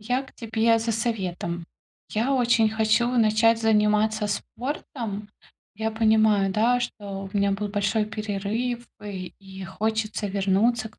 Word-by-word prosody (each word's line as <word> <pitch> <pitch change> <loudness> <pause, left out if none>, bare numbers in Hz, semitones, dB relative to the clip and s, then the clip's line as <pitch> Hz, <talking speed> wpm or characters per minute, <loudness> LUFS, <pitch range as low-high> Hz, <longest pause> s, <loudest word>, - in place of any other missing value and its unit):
Я 250 +5 -1
к 270 - -15
тебе 225 0 +1
за 225 0 -1
советом. 185 -7 -3 0.4
Я 230 +6 0
очень 235 -4 +3
хочу 220 +2 +2
начать 225 -1 +3
заниматься 215 0 +2
спортом. 225 -2 -5 0.5
Я 220 +2 -2
понимаю, 220 -3 +3
да, 235 +5 +3
что 200 -4 -5
у - - -2
меня 200 0 +2
был 205 +1 -2
большой 205 +1 0
перерыв, 215 +3 -3 0.2
и 190 -3 -6
и 190 -1 -9
хочется 215 +2 -2
вернуться 205 +4 +1
к 215 - -25
215 Hz, 135 wpm, -25 LUFS, 205-230 Hz, 0.5 s, очень